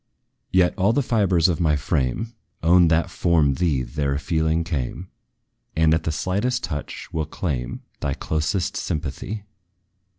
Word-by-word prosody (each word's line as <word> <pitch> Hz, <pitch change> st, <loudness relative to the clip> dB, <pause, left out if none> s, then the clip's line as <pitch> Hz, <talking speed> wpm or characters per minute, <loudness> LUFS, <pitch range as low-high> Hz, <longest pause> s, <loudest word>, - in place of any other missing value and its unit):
Yet 90 Hz, -1 st, +4 dB
all 100 Hz, +5 st, +4 dB
the 140 Hz, -, +2 dB
fibres 95 Hz, -8 st, +3 dB
of 85 Hz, -2 st, 0 dB
my 80 Hz, -4 st, +3 dB
frame 75 Hz, -, -1 dB, 0.3 s
Own 85 Hz, +1 st, +6 dB
that 80 Hz, +1 st, +2 dB
from 80 Hz, -5 st, +3 dB
thee 75 Hz, -4 st, +1 dB
their 70 Hz, +1 st, -1 dB
feeling 80 Hz, +2 st, +1 dB
came; 80 Hz, +3 st, -4 dB, 0.6 s
And, 80 Hz, 0 st, +4 dB
at 80 Hz, 0 st, 0 dB
the 80 Hz, -, +1 dB
slightest 100 Hz, +10 st, -1 dB
touch, 75 Hz, -1 st, -5 dB
will 80 Hz, -1 st, -1 dB
claim 70 Hz, -9 st, -3 dB, 0.2 s
Thy 70 Hz, -1 st, -1 dB
closest 80 Hz, +4 st, -1 dB
sympathy. 85 Hz, +7 st, -3 dB
80 Hz, 140 wpm, -23 LUFS, 75-90 Hz, 0.6 s, Own